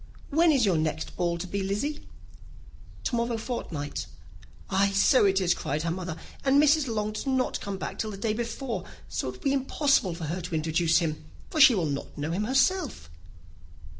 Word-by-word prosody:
"When 325 +3 +5
is 265 -6 +3
your 185 -5 +2
next 155 0 -2
ball 175 -1 0
to 170 - -5
be, 200 +2 -3
Lizzy?" 210 +11 -3 1.0
"To 245 - -1
morrow 235 0 0
fortnight." 165 - -4 0.6
"Ay, 195 +1 +2
so 200 +4 +4
it 195 -1 +3
is," 180 -2 +3
cried 150 +3 -3
her 165 - -1
mother, 175 -2 -4 0.3
"and 275 +1 +4
Mrs. 300 -1 +4
Long 215 -2 -1
does 215 +5 -5
not 260 -1 0
come 200 -1 -4
back - - -6
till 220 - -1
the 200 - -6
day 215 +2 -1
before; 235 +2 -3 0.2
so, - - -3
it - - -6
will - - -15
be 275 -2 +1
impossible 270 - +2
for 170 - -7
her 170 +4 -3
to 170 -1 -4
introduce 160 +1 +2
him, 155 -3 -1 0.3
for 310 - +2
she 270 -4 +9
will 180 -5 0
not 140 -2 -4
know 150 +2 -2
him 195 +5 -1
herself." 270 - +1
200 Hz, 195 wpm, -27 LUFS, 170-260 Hz, 1.0 s, she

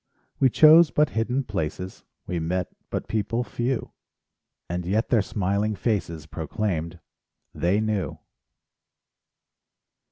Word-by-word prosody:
We 135 - +5
chose 155 +5 +7
but 150 0 +2
hidden 125 +5 0
places, 90 -3 -4 0.2
We 90 - -2
met 90 +3 -2 0.2
but - - -3
people 115 +2 -1
few; 120 +1 -2 0.8
And 90 +1 -3
yet 105 +6 0
their 115 -4 +4
smiling 100 +2 -1
faces 90 -8 -2
Proclaimed: 85 +1 -3 0.5
they 90 +4 +1
knew! 105 -5 -1
100 Hz, 105 wpm, -25 LUFS, 90-115 Hz, 0.8 s, chose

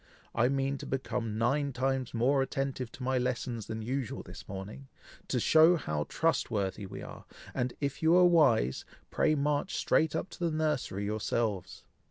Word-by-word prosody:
I 120 +1 +3
mean 135 0 0
to - - -7
become 125 -4 -2
nine 135 +5 +1
times 130 0 -1
more 130 +4 +2
attentive 135 -2 -2
to 130 - -8
my 130 0 +1
lessons 120 -3 -2
than 110 0 -4
usual 130 +1 -3
this - - -11
morning, 100 +7 -7 0.4
to 125 - 0
show 160 +7 +6
how 75 - -2
trust 165 0 +1
worthy 100 -2 -2
we - - -8
are, - - -10 0.3
and 125 0 -2
if 140 -1 -3
you 160 +2 +5
are 180 0 +7
wise, 135 - +4 0.3
pray 155 - +2
march 145 +4 0
straight 160 -1 +2
up 175 - -3
to - - -7
the 160 -2 0
nursery 135 -10 -1
yourselves. 105 -2 -2
130 Hz, 175 wpm, -30 LUFS, 115-145 Hz, 0.4 s, are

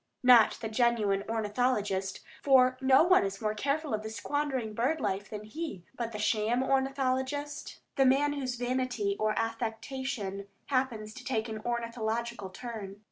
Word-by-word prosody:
Not 245 -3 +7
the 225 - -2
genuine 220 -4 +2
ornithologist, 210 -3 0 0.2
for 255 -2 +5
no 265 +2 +6
one 360 - +5
is 195 0 -3
more 215 -1 0
careful 280 +5 -1
of 215 0 -1
squandering 265 -2 -2
bird 260 +9 0
life 195 0 -2
than 210 -1 -6
he; 215 - -6
but 235 -2 -3
the 215 - -5
sham 220 +3 +1
ornithologist, 270 +1 -1 0.2
the 270 - +5
man 285 +3 +3
whose 260 -3 -3
vanity 245 -4 -1
or 215 0 +1
affectation 225 -2 -3 0.2
happens 245 -6 -1
to 255 - -10
take 235 -3 -1
an 220 -1 -5
ornithological 235 -2 -2
turn. 205 -2 -7
235 Hz, 145 wpm, -30 LUFS, 215-260 Hz, 0.2 s, Not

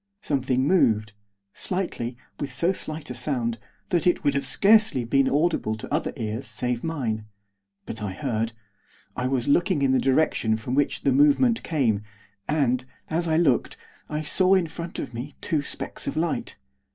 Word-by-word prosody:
Something 130 -2 +1
moved. 110 - +3 0.4
Slightly, 130 -10 -3 0.2
with 140 -2 -3
so 170 +8 +1
slight 155 -6 -5
a - - -3
sound, 120 -3 -1 0.3
that 175 -1 +1
it 175 - +2
would 140 -1 +1
scarcely 205 - +4
have 115 - -8
been 135 -1 +4
audible 150 -7 +1
to 110 - -7
other - - 0
ears 110 +2 -3
save 120 +2 -2
mine. 120 -10 -2 0.6
But 110 - -5
I 100 -3 -3
heard. 115 -1 -2 0.6
I 125 - -1
was 130 -2 -1
looking 175 0 +3
in 135 - +3
the 130 - +3
direction 130 -5 +2
from 115 +3 -5
which 145 +1 +1
the 135 - +3
movement 150 - +4
came, 125 -10 +1 0.5
and, 130 -5 +1 0.3
as 170 +2 0
I 160 -1 +2
looked, 145 -8 +2 0.3
I 150 +1 -2
saw 185 +5 +4
in 185 -2 +2
front 165 +1 -6
of - - -5
me 130 +5 -6
two 155 -3 0
specks 140 - -5
of - - -2
light. - - -1
135 Hz, 170 wpm, -25 LUFS, 120-160 Hz, 0.6 s, scarcely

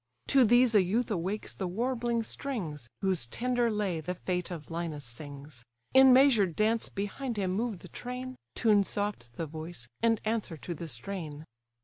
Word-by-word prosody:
To 270 -2 +6
these 240 +1 +5
a 210 - +7
youth 220 +6 0
awakes 195 +3 -2
the 190 - -3
warbling 235 +3 0
strings, 175 - -4
Whose 185 -11 +1
tender 245 - +1
lay 200 -6 -1
the 180 +4 -3
fate 180 0 -2
of 165 -3 -7
Linus 165 -4 -3
sings; 140 +1 -8 0.3
In 265 0 +8
measured 245 - +5
dance 220 +1 +1
behind 215 +5 -3
him 190 -2 0
move 220 +2 -1
the - - -12
train, 250 +1 -6 0.2
Tune 210 -3 +4
soft 205 - -3
the 165 - -3
voice, 155 -4 -8
and 225 -1 +3
answer 215 -7 -1
to 175 - -5
the 170 +1 -6
strain. 155 +3 -6
200 Hz, 165 wpm, -30 LUFS, 165-235 Hz, 0.3 s, In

